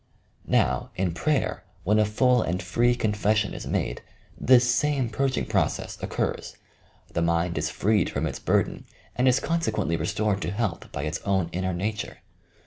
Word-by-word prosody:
Now, 60 0 +2
in 90 -3 0
prayer, 150 - 0 0.2
when 105 +3 +3
a 105 - +4
full 125 +4 +3
and 90 -1 -1
free 120 +6 +2
confession 105 -1 +1
is - - -6
made, - - -1 0.3
this 125 -1 +5
same 130 0 +1
purging 130 +3 0
process - - -1
occurs. - - -3 0.6
The 85 - 0
mind 85 +1 +1
is 75 +1 -1
freed 105 0 +1
from - - -2
its - - -4
burden - - 0 0.3
and 125 +1 +2
is 130 +1 +5
consequently 135 - 0
restored 100 +5 0
to - - -2
health 100 -3 -3
by 70 - -4
its 80 +1 -2
own 95 -4 0
inner 95 +1 -1
nature. 105 +4 -3
105 Hz, 160 wpm, -26 LUFS, 85-120 Hz, 0.6 s, this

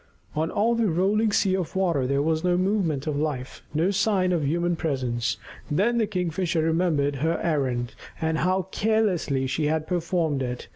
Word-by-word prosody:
On 160 +2 0
all 225 +3 +2
the 230 -3 +1
rolling 200 +6 +2
sea 195 -2 +2
of 185 -2 -3
water 170 -9 +1
there 140 +1 +1
was 160 +1 0
no 180 -1 +2
movement 185 -7 0
of 155 -2 -1
life, 145 -4 -3
no 165 +6 +1
sign 200 -2 +2
of 170 -3 +1
any 140 - 0
human 170 +2 +1
presence. 125 -7 -1 0.3
Then 220 +10 +2
the 220 - +2
Kingfisher 180 -3 -1
remembered 160 -4 +1
her 160 +5 0
errand, 130 -7 0 0.3
and 160 -1 0
how 185 +1 +1
carelessly 195 -11 +1
she 150 +3 0
had 155 0 0
performed 165 -4 0
it. 125 -1 -4
165 Hz, 180 wpm, -25 LUFS, 145-185 Hz, 0.3 s, all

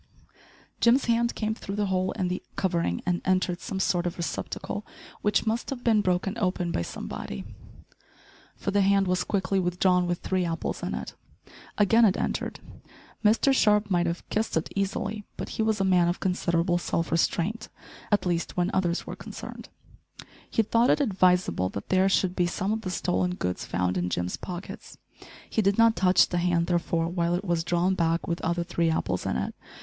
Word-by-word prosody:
Jim's 240 +3 +4
hand 235 0 +1
came 220 0 -1
through 200 -2 -6
the 210 0 0
hole 185 -1 0
in 185 - -1
the 180 +1 -2
covering 170 - 0
and 175 -1 0
entered 185 -1 +1
some 195 -5 -4
sort 180 -2 +1
of 175 - -4
receptacle, 175 +5 -4 0.4
which 210 +1 +2
must 225 +2 -1
have 255 -3 -5
been 220 -3 +4
broken 185 +1 0
open 180 -3 0
by - - -1
somebody, 65 -5 -6 1.1
for - - -3
the 200 0 +3
hand 195 0 +4
was 180 0 +1
quickly 195 -1 0
withdrawn 180 0 +2
with 175 0 0
three 185 +1 -1
apples 165 -1 -3
in - - -3
it. - - -6 0.6
Again 225 +3 +5
it 200 -4 +4
entered. - - -2 0.6
Mr 225 +6 +4
Sharp 210 -4 +3
might 175 -1 +2
have 170 0 -4
kissed 215 -5 0
it 160 - -3
easily, 200 +2 -2
but - - -5
he - - -3
was 220 -1 +1
a - - +2
man 180 -2 +4
of 175 - -1
considerable 175 -1 +1
self 165 -1 -2
restraint 180 +6 0 0.4
at 205 -3 +2
least 175 0 -1
when 180 0 +1
others 175 -2 0
were - - -6
concerned. - - -9 0.8
He 225 - +2
thought 230 +3 +3
it - - +4
advisable 185 - +2
that 100 - -7
there 190 +1 +4
should 185 -1 +1
be 175 -1 +2
some 190 +3 -2
of 220 - -2
the 185 - -4
stolen 180 0 0
goods 90 - -3
found 90 +1 -1
in 90 0 -1
Jim's 90 0 -2
pockets! 180 +1 -8 0.5
He 220 - 0
did 200 -1 +2
not 230 -1 +5
touch 180 0 +4
the 175 - 0
hand, 175 -1 +2
therefore, 170 -1 0
while 170 0 0
it 185 +3 -3
was 170 -3 0
drawn 175 +2 +1
back 165 -2 0
with 170 0 -2
other 170 +1 0
three 170 -1 0
apples 90 - -1
in 65 - 0
it. 65 - -3
180 Hz, 190 wpm, -27 LUFS, 170-200 Hz, 1.1 s, Again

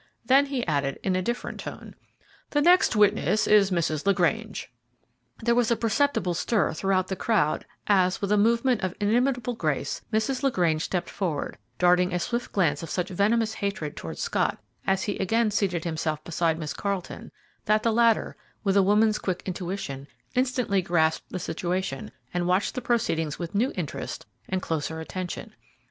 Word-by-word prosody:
Then 275 +2 +5
he 270 -3 -2
added, 140 -3 -1
in 190 -1 +1
a 185 - +1
different 240 +6 -3
tone, - - -8 0.6
"The 290 - +1
next 355 -6 +5
witness 210 +1 +3
is 210 -2 +5
Mrs. 165 -4 0
LaGrange." 200 +3 0 0.7
There 235 +1 +3
was 240 -1 +2
a 235 - +3
perceptible 230 -5 +1
stir 200 0 +1
throughout 185 +2 +1
the 190 - -2
crowd 180 -7 +1 0.2
as, 185 -3 +3
with 200 0 -2
a - - +5
movement 235 +3 +3
of 185 -1 -2
inimitable 245 +3 +1
grace, 155 - -2
Mrs. 225 +4 0
LaGrange 175 - +1
stepped 180 -2 -2
forward, 165 -7 -3 0.2
darting 180 0 +3
a - - +1
swift 240 +6 -3
glance 160 -7 +1
of 165 - -7
such 180 +2 -2
venomous 215 +4 +1
hatred 200 -8 -3
towards 80 -2 -5
Scott, - - 0 0.3
as 190 0 +2
he 205 - -3
again 225 +3 +2
seated 185 -5 0
himself 155 -2 -2
beside 165 -1 0
Miss 155 -2 -4
Carleton, 200 -3 -4 0.3
that 215 0 +2
the 230 - +2
latter, 230 -1 +3 0.3
with 195 -2 +1
a 200 - +6
woman's 210 +2 +3
quick 185 -2 -3
intuition, 175 -7 -4 0.3
instantly 250 -6 +1
grasped 160 -2 +1
the - - -4
situation 175 -4 -3 0.2
and 175 0 0
watched 185 +3 +1
the 255 - -3
proceedings 165 -11 0
with 170 -2 -5
new 235 +7 +1
interest 170 -6 -5 0.2
and 190 0 -1
closer 160 0 -2
attention. 180 +2 -6
195 Hz, 165 wpm, -26 LUFS, 170-225 Hz, 0.7 s, a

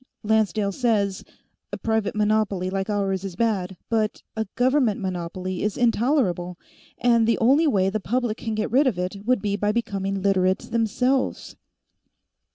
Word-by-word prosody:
Lancedale 215 -1 +1
says, 205 -4 0 0.5
a - - -4
private 220 -2 -1
monopoly 210 -3 +1
like 195 +1 -2
ours 195 -2 -1
is 190 -3 -6
bad, 195 -4 -1
but 220 -2 -1
a 220 0 -2
government 255 -4 +2
monopoly 185 0 -4
is 210 -1 -1
intolerable, 225 - +1 0.4
and 235 -2 +3
the 230 - +3
only 275 +8 +4
way 195 -8 +2
the 210 +3 -1
public 235 +1 -1
can 225 -1 -4
get 215 0 -2
rid 270 +4 +4
of 225 -8 0
it 180 +2 -3
would 250 -4 +2
be 200 -1 0
by 205 0 0
becoming 195 -3 -2
Literates, 190 -1 +1
themselves." 250 +4 0
210 Hz, 155 wpm, -24 LUFS, 195-230 Hz, 0.5 s, only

